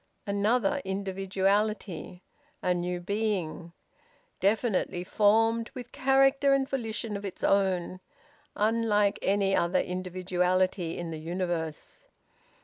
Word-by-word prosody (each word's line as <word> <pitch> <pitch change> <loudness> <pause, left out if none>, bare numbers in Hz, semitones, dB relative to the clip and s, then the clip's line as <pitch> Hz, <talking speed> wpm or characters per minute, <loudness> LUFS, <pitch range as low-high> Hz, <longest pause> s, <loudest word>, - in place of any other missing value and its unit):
Another 235 +8 +1
individuality; 195 0 -1 0.4
a 180 - +2
new 175 0 -2
being; 185 -4 -2 0.7
definitely 200 -3 +1
formed, 225 +4 +2
with 245 -2 -8
character 270 +1 +4
and 270 -1 0
volition 225 -4 -3
of 200 - -5
its 195 - -7
own; 185 -2 +1 0.6
unlike 210 -2 +2
any 195 0 +2
other 170 +2 +2
individuality 180 -1 0
in 170 -1 -5
the 160 - -5
universe! 165 -2 -4
195 Hz, 100 wpm, -28 LUFS, 180-220 Hz, 0.7 s, character